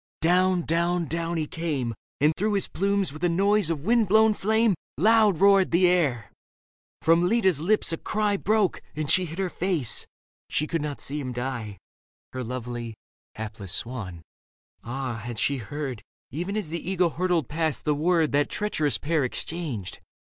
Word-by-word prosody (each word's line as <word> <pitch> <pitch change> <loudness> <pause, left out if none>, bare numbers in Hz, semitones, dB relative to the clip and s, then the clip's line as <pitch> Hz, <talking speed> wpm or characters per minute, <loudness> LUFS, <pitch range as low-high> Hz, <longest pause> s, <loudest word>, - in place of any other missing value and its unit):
Down, 180 +1 +3
down 170 +1 0 0.3
he 155 - 0
came. 150 -8 -3 0.3
And 150 +2 +4
through 210 +2 0
his 200 -2 0
plumes 195 -4 0
with 155 +3 -10
a 175 - +3
noise 200 +1 +2
of 160 -2 -3
wind 230 0 +3
blown 220 +2 +5
flame 220 +2 +2
I - - +2
6 - - -7 0.2
Leda 160 - -3
Loud 215 -4 +5
roared 195 -1 +5
the 175 +2 +4
air. 140 - +1 0.7
From 165 +2 +4
Leda's 190 -8 +3
lips 195 -1 +2
a - - -1
cry 210 +2 0
Broke, 210 -1 +1
and 150 -1 -1
she 185 - +3
hid 165 0 -8
her 190 -2 -1
face 170 - 0 0.2
— - - -80
she 150 - 0
could 165 0 -2
not 145 -1 -4
see 145 +2 -3
him 130 -3 -4
die, 120 -5 -4 0.6
Her 130 0 -3
lovely, 120 -1 -5 0.4
hapless 105 -3 -6
swan. 100 -10 -5 0.6
Ah, 130 -1 -4
had 120 -1 -6
she 140 +5 0
heard. 130 -1 -5 0.3
Even 180 - -3
as 200 -7 -2
the 170 +1 -4
eagle 180 -2 +1
hurtled 175 -2 0
past, 160 0 -2
the 150 - +3
word 160 +1 +2
That 145 +1 +2
treacherous 155 -9 0
pair 155 0 0
exchanged. 130 - -4
165 Hz, 175 wpm, -26 LUFS, 135-190 Hz, 0.7 s, blown